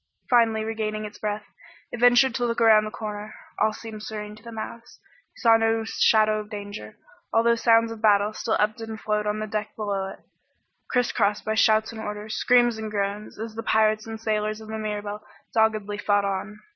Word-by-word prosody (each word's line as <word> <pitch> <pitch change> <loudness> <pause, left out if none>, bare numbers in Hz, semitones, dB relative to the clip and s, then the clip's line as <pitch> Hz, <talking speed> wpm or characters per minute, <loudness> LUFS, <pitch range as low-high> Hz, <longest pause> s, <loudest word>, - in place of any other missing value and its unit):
Finally 225 -3 +4
regaining 215 -1 -3
its 210 - -10
breath, 210 0 -3 0.5
it 240 - -6
ventured 245 +1 +5
to 245 - -2
look 235 -1 0
around 220 -2 +6
the - - -4
corner. 215 0 -6 0.2
All 215 - +3
seemed 215 0 -9
serene 210 -1 -6
to 215 - -17
the 235 - -10
mouse, 230 +1 -8 0.4
who - - -17
saw 230 -2 +6
no 225 0 +1
shadow 215 -1 +3
of 210 0 -8
danger, 205 -1 -8 0.3
although 230 +1 +4
sounds 230 -1 +3
of 225 -1 -8
battle 210 -1 +4
still 220 +1 -1
ebbed 215 +2 0
and 225 -1 -6
flowed 210 0 -1
on 210 0 0
the 215 - -3
deck 215 0 -4
below 200 -3 -2
it, - - -10 0.7
crisscrossed 215 -4 +1
by 220 - 0
shouts 220 0 +3
and 220 -1 -8
orders, 210 0 -5
screams 240 -2 +3
and 220 -1 -4
groans, 205 0 -3
as 225 0 -6
the 225 - -5
pirates 215 0 +2
and 225 0 -5
the 220 - -19
sailors 215 0 -1
of 220 0 -11
the 220 0 -4
Mirabelle 210 -1 -4 0.3
doggedly 215 -2 +1
fought 205 -1 +2
on. 200 +2 -3
215 Hz, 200 wpm, -25 LUFS, 210-225 Hz, 0.7 s, around